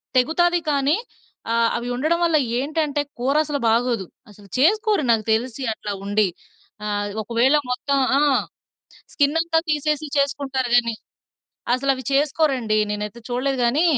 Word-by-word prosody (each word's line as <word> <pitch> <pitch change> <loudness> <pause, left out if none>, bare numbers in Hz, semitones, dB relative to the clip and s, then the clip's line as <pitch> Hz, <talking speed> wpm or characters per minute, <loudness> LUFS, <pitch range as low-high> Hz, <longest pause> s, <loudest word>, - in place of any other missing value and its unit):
తెగుతాది 345 +7 +3
కానీ, 280 +2 +2 0.6
ఆహ్, 230 0 +3
అవి 235 +1 -5
ఉండడం 310 +7 +1
వల్ల 330 -2 +3 0.2
ఏంటంటే 295 +1 -1 0.2
కూర 265 +4 0
అసలు 295 -2 -2
బాగోదు. 230 -3 +1 0.2
అసలు 205 -1 -16
చేసుకోరు 415 - +3
నాకు 225 -2 +2
తెలిసి 235 +4 -1
అట్లా 210 - -6
ఉండి. 205 0 +2 0.6
ఆ! - - -2
ఆది 205 0 -4
ఒకవేళ 235 +6 +2 0.2
మొత్తం 280 +3 0 0.2
ఆ! - - +3 0.9
స్కిన్ 290 +1 +2
అంతా 330 0 +1
తీసేసి 300 0 0
చేసుకుంటారు 275 -2 0
కాని 235 -2 +2 0.8
అసలు 275 +2 0
అవి 260 0 -8
చేసుకోరండి. 275 -6 +1
నేనైతే 210 +2 -4
చూడలేదు. 260 +2 -1
కానీ, 275 +8 +2
270 Hz, 135 wpm, -22 LUFS, 235-300 Hz, 0.9 s, తెగుతాది